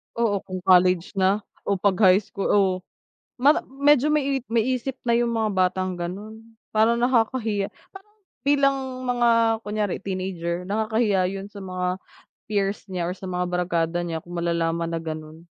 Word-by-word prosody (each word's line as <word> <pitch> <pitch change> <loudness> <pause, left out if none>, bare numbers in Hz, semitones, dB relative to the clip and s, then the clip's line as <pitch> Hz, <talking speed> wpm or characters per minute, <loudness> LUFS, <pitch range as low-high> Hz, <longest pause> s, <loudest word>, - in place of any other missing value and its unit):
Oo 220 -4 +1
kung 185 -1 -6
college 180 -1 +4
na 195 +2 +2 0.2
o 200 - +2
'pag 190 0 +1
high 190 0 +6
school 200 - -4
oh 195 -2 +3 0.6
mama 285 +5 +4 0.2
medyo 290 0 +4
may 280 -3 +1
may 230 -1 +2
isip 260 +1 -2
na 235 - +2
yung 235 0 +2
mga 220 -2 0
batang 185 0 +1
gano'n. 205 +6 -6 0.3
Parang 225 +2 +3
nakakahiya, 230 -4 +1 0.6
parang 250 - -65
bilang 275 -1 +3 0.3
mga 230 -2 +3
kunyari 210 -2 -1
teenager 185 -3 -3
nakakahiya 215 -2 +1
'yun 195 +1 -4
sa 200 -2 -10
mga 185 -1 -2 0.5
peers 200 -1 0
niya 180 -2 -3
or - - -4
sa 190 - -9
mga 180 0 -1
barkada 175 -1 0
niya 165 -2 -4
kung 175 - -12
malalaman 170 -1 0
na 165 0 -3
gano'n. 155 0 -7
195 Hz, 160 wpm, -24 LUFS, 180-230 Hz, 0.6 s, high